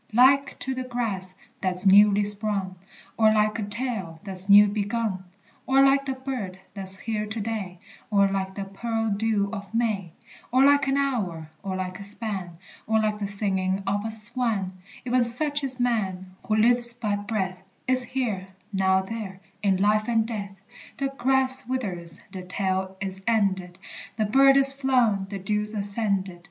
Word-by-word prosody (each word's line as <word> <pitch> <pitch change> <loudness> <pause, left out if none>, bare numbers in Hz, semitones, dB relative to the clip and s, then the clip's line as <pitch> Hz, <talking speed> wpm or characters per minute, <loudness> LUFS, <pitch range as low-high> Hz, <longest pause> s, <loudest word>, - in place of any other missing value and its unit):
Like 275 +4 +4
to 265 - -3
the 255 0 -4
grass 215 -7 -4 0.3
that's 185 0 -2
newly 205 +1 +6
sprung, 205 -2 +1 0.4
Or 220 -1 +5
like 215 +1 +1
a - - -2
tale 205 -6 -4
that's 190 -1 -5
new 205 +1 +9
begun, 205 -1 -3 0.4
Or 270 +1 +5
like 275 0 +2
the 265 - -1
bird 260 -8 -6 0.2
that's 190 -1 -1
here 215 0 -4
to 220 +2 -5
day, 205 -4 -4 0.3
Or 200 -2 +3
like 190 -1 -3
the 200 - -4
pearled 225 +1 -3
dew 210 -2 0
of 200 -2 -7
May, 210 -7 -1 0.4
Or 260 +2 +4
like 285 -1 +4
an 270 +1 +1
hour, 190 - -2
or 190 -1 -4
like 185 0 -5
a - - -7
span, 200 -4 -3 0.3
Or 220 0 +2
like 215 -1 -1
the 200 - -3
singing 195 -1 -2
of 205 +1 -1
a 220 - -4
swan, 220 -3 -1 0.3
E'en 250 0 +2
such 290 +5 +2
is 260 -1 -1
man; 190 -6 -2
who 215 - +1
lives 240 +2 +6
by 215 -4 -2
breath, 195 -3 -3 0.3
Is 255 0 +5
here, 225 -7 -3 0.3
now 190 0 +2
there, 195 -2 -7 0.2
in 195 -2 +2
life 210 +2 +1
and 225 -2 +2
death. 200 -4 -6 0.4
The 275 0 -1
grass 265 -1 +4
withers, 185 -10 +1
the 185 - -7
tale 190 +1 -3
is 190 0 -5
ended, 190 -5 0 0.4
The 215 - +1
bird 270 +5 +5
is 275 0 +7
flown, 250 -8 +1
the 200 - -5
dew's 210 +2 -3
ascended. 200 -3 -1
210 Hz, 170 wpm, -25 LUFS, 190-240 Hz, 0.4 s, new